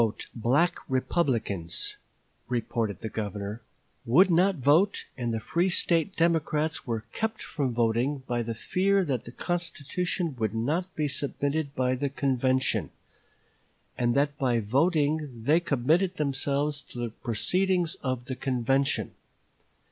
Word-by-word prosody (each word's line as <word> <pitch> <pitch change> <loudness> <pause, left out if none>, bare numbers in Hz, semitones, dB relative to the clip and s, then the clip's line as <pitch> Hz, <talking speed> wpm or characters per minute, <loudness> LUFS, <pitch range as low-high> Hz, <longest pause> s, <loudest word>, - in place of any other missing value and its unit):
"The 115 -1 0
black 135 +10 +2
Republicans," 120 - 0 0.5
reported 115 -5 -2
the - - -3
Governor, 105 0 -4 0.4
"would 175 +11 +5
not 185 +3 +4
vote, 160 +8 +3
and 120 -2 -2
the 115 - -1
free 170 +10 0
State 170 +1 +1
Democrats 160 -3 +1
were 115 -2 -2
kept 220 0 -2
from 140 -5 -2
voting 120 +4 +1
by 120 -2 -1
the 115 0 -3
fear 195 - +1
that 130 -7 -2
the 120 - -8
constitution 175 0 -2
would 110 -1 -1
not 155 +11 -1
be 150 -1 0
submitted 140 +1 -2
by 130 0 +1
the 140 +2 -1
convention, 130 -1 +1 1.1
and 120 -1 +1
that 145 +1 +2
by 125 -3 +2
voting 145 - +1
they 150 +7 +4
committed 165 +4 +1
themselves 145 0 0
to 125 - -12
the 120 -1 -2
proceeding 180 - +1 0.2
of 130 -2 -2
the 130 - -4
convention. 135 +2 0
140 Hz, 135 wpm, -28 LUFS, 120-165 Hz, 1.1 s, would